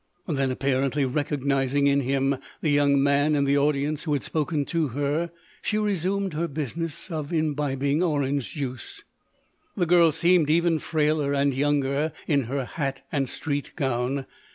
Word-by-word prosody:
Then, 135 -4 0
apparently 135 +1 0
recognising 140 0 0
in 140 0 +4
him 135 +1 +1 0.2
the 155 - +1
young 140 -1 +3
man 140 +2 +3
in 140 - +2
the 140 +1 +3
audience 145 +1 0
who 155 - -1
had 140 - -1
spoken 150 -2 -1
to 165 -1 0
her, 145 +6 -1 0.3
she 215 - -1
resumed 200 -2 0
her 165 +3 -1
business 160 +4 -5
of 155 -2 -4
imbibing 145 -2 0
orange 145 -5 0
juice. 145 - -5 0.7
The 180 - +2
girl 170 -1 +5
seemed 170 -1 +3
even 165 0 +3
frailer 150 -2 0
and 140 0 +2
younger 145 +2 0
in 140 -5 +1
her 135 +2 -2
hat 135 -2 -4
and 135 -4 0
street 145 -2 -3
gown. 130 -2 -1
145 Hz, 155 wpm, -25 LUFS, 140-160 Hz, 0.7 s, girl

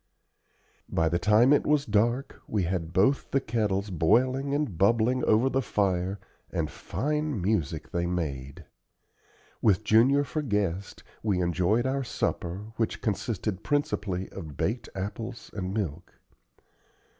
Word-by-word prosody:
By 80 -1 +1
the 85 +1 0
time 110 +8 +5
it 145 - +3
was 150 -1 +2
dark, 120 +5 0
we 105 -3 0
had 85 -2 -2
both 105 +11 +2
the 135 - +2
kettles 105 -5 -1
boiling 130 - +2
and 145 - -1
bubbling 115 +7 +3
over 110 +4 +4
the 135 0 +1
fire, 95 -3 0 0.3
and 75 -3 -2
fine 150 - -2
music 85 -6 -1
they 85 0 0
made. 70 -6 -4 1.0
With 105 -1 +3
Junior 125 +7 +5
for 155 +2 -3
guest, 100 - -2 0.2
we 100 -4 +1
enjoyed 90 +7 +1
our 135 +1 0
supper, 100 -3 -3
which 115 - -1
consisted 105 -2 -2
principally 105 - -1
of 80 -7 -9
baked 115 +4 -1
apples 110 +5 -5
and 95 -2 -3
milk. 90 -5 -4
105 Hz, 135 wpm, -28 LUFS, 90-125 Hz, 1.0 s, time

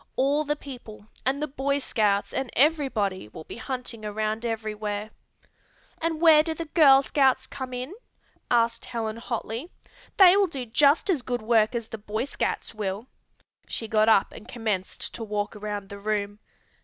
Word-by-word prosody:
All 280 +3 +2
the 295 0 -1
people, 245 -8 -10 0.2
and 275 +3 0
the - - -1
Boy 280 0 -1
Scouts 210 -7 0
and 265 -2 -2
everybody 255 - +1
will 110 - -10
be - - -9
hunting 245 -2 -6
around 215 +2 -2
everywhere." 215 -1 -3 0.9
"And 325 -1 -1
where 320 -2 +7
do 320 0 -3
the 330 - -5
Girl 285 -4 +6
Scouts 265 -2 +2
come 260 -1 -7
in?" 250 +6 -5 0.6
asked 230 -1 +2
Helen 225 -2 -4
hotly. 235 +5 -4 0.5
"They 375 -2 +8
will 400 -1 +4
do 270 -7 -6
just 285 - +3
as 310 -8 0
good 245 -2 -3
work 220 0 +3
as 230 -2 -3
the 225 - -7
Boy 215 +3 -3
Scouts 285 - -3
will." 205 0 -4 0.6
She 225 - -4
got 215 0 +3
up 210 -3 +4
and 215 - -12
commenced 215 -6 -3
to 230 - -6
walk 210 0 -3
around 205 -1 -5
the 200 - -8
room. 205 0 -2
235 Hz, 170 wpm, -26 LUFS, 215-275 Hz, 0.9 s, They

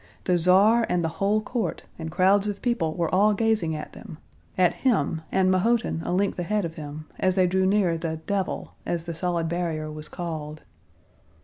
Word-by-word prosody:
The 180 - +2
Tsar 200 +7 +5
and 175 -1 +1
the - - +1
whole 205 +2 +3
court 215 -6 -3 0.2
and 160 -1 -4
crowds 195 +4 +3
of 205 - -4
people 210 -11 0
were 170 -1 -1
all 205 +3 +4
gazing 220 -7 +1
at 150 - -7
them—at 175 +3 -3
him, 170 - 0
and 190 -1 +3
Mahotin 220 -1 +1
a - - -3
length 190 +1 0
ahead 205 +2 0
of 165 - -5
him, 155 0 -8
as 185 -1 +2
they 185 -2 +4
drew 190 +1 +2
near 190 -5 +2
the 160 -1 -3
"devil," 195 -1 -2
as 170 -1 -2
the 170 0 -5
solid 170 0 -1
barrier 160 -2 -2
was 150 0 -7
called. 155 -3 -6
180 Hz, 185 wpm, -25 LUFS, 160-200 Hz, 0.2 s, Tsar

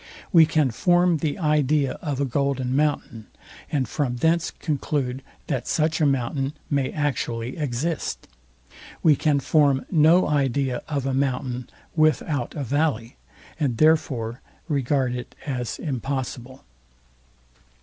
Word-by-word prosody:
We 165 -3 +8
can 150 -5 +2
form 175 +6 +3
the 150 -1 -2
idea 150 -4 +2
of 145 -5 -3
a 140 - +1
golden 130 -1 -1
mountain, 140 -7 -1 0.4
and 135 -4 0
from 125 0 -1
thence 165 +6 +1
conclude 135 -4 -2 0.2
that 130 -5 -3
such 160 +1 +1
a 150 - +5
mountain 135 +1 -1 0.2
may 140 -2 +1
actually 125 -5 -2
exist. 150 +2 -3 0.8
We 155 -2 +6
can 145 -1 +2
form 140 -1 +2
no 165 +2 +5
idea 135 -3 0
of 140 -3 -2
a 135 - 0
mountain 130 -2 -1 0.3
without 155 -4 +1
a 145 - -3
valley, 135 -3 -1 0.4
and 135 -7 0
therefore 130 -7 +2 0.3
regard 135 -3 0
it 125 -1 -7
as 125 -5 -3
impossible. 130 -2 -4
140 Hz, 125 wpm, -24 LUFS, 125-155 Hz, 0.8 s, We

